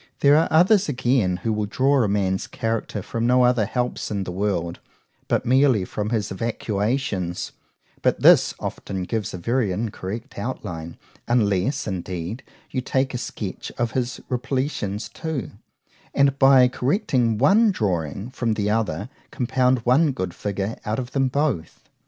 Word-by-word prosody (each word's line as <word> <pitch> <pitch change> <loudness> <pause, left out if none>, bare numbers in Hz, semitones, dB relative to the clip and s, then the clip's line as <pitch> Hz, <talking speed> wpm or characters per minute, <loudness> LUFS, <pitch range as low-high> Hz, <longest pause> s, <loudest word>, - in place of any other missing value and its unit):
There 140 +1 +6
are 160 +2 +4
others 185 +4 +4
again, 120 -8 +1
who 110 - +1
will 105 -1 -1
draw 135 +5 +2
a 110 - +2
man's 95 -2 0
character 115 -3 -3
from 115 0 -2
no 125 +1 +5
other 125 -4 +3
helps 125 -1 -2
in 100 -2 -2
the 90 - -5
world, 90 -3 -2 0.5
but - - 0
merely 130 -5 +4
from 105 +2 -3
his 110 -4 -1
evacuations;—but 105 -2 -3
this - - +6
often 95 -2 -4
gives 105 +2 -2
a - - -5
very 115 +3 0
incorrect 110 +3 -5
outline,—unless, 100 - -2
indeed, 95 +3 -4 0.3
you 130 - -1
take 130 +1 0
a 125 - -2
sketch 105 -5 -5
of 120 -1 0
his 125 0 -2
repletions 125 -5 -2
too; 160 - -5 0.6
and 140 0 +3
by 135 -2 +7
correcting 125 - +1
one 200 - +5
drawing 95 - -2
from 120 -4 -1
the 105 0 0
other, 110 -1 -1 0.2
compound 125 -1 +1
one 140 +4 +4
good 95 -8 -3
figure 100 +4 -3
out 110 +1 -2
of 125 -1 -4
them 135 -1 +2
both. 130 - -2
115 Hz, 145 wpm, -23 LUFS, 100-130 Hz, 0.6 s, by